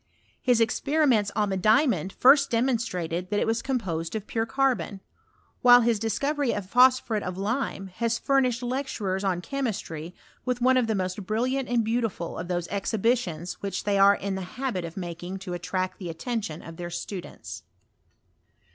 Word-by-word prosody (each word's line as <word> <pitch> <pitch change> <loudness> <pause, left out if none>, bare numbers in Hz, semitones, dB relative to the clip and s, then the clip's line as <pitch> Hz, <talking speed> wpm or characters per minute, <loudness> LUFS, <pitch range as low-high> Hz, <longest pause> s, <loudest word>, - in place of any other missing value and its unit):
His 245 -3 +3
experiments 235 -2 +2
on 210 -1 +1
the 190 - -1
diamond 215 0 +3
first 275 +5 +5
demonstrated 200 -8 -1
that 205 - +1
it - - +1
was 225 +1 0
composed 185 -10 -2
of 215 -2 -3
pure 225 0 -2
carbon; 225 -6 0 0.6
while 245 -1 +8
bis 230 -2 +2
dis 225 0 -1
covery 285 -4 0
of 205 - -4
phosphnret 250 -2 +4
of 185 -1 -5
lime 205 0 -2
has 230 -1 +1
furnished 255 -3 +1
lecturen 240 -7 -2
on 185 -3 0
chemistry 180 - -4 0.3
with 250 -1 -1
one 255 +1 +4
of 245 -3 +2
the 220 - 0
most 185 +1 -2
brilliant 250 +4 0
and 240 -2 +2
beautiful 225 -6 -2
of 175 - -5
those 175 -1 -2
exhibitions 200 -4 -1
which 200 -1 -3
they 200 -1 +1
are 200 +1 +7
in 200 0 -3
the 190 - -3 0.2
habit 250 -9 -2
of 165 +2 -9
making 175 +1 -5
to 190 -2 -6
attract 185 +1 -3
the 180 -3 -5
attention 170 -1 -4
of 165 0 -10
their 175 0 -5
students. 175 +2 -7
215 Hz, 170 wpm, -26 LUFS, 185-245 Hz, 0.6 s, while